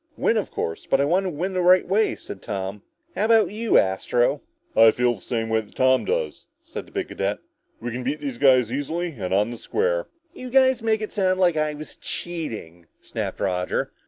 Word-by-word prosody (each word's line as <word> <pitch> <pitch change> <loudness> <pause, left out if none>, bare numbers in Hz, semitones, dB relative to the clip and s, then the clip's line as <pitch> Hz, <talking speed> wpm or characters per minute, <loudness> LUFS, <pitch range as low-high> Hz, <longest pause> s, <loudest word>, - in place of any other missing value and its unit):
"Win, 230 - +2
of 215 - -1
course, 80 - -4
but 135 - +3
I 140 - +3
want 180 +6 +2
to - - 0
win 180 +4 -3
the 185 - 0
right 180 +1 +5
way," 210 +4 +2
said - - -10
Tom. 100 -1 -4 0.3
"How 200 +4 +1
about 225 -2 +4
you, 225 +2 +2
Astro?" 100 +6 +2 0.4
asked - - -35
Roger. 115 - +8
"I - - +8
feel 125 0 +2
the 105 - -12
same 115 -2 -2
way 110 0 +2
that 105 - -19
Tom 130 0 +3
does," 485 0 -2
said - - -8
the - - -18
big 390 -2 -3
cadet. - - -2 0.4
"We 120 +2 -4
can 125 +2 -4
beat 140 +4 -2
these 135 -5 -5
guys 130 -4 +5
easily 160 +6 -2
and 90 -2 -3
on 105 +4 +2
the 120 - -6
square." - - -1 0.3
"You 255 -8 -8
guys 260 -1 +4
make 220 -1 +1
it 215 - -5
sound 185 -2 +1
like 175 -3 +4
I 155 -1 0
was 155 +1 -9
cheating," 110 - -5
snapped - - -5
Roger. 90 -1 -1
150 Hz, 220 wpm, -24 LUFS, -, 0.4 s, Roger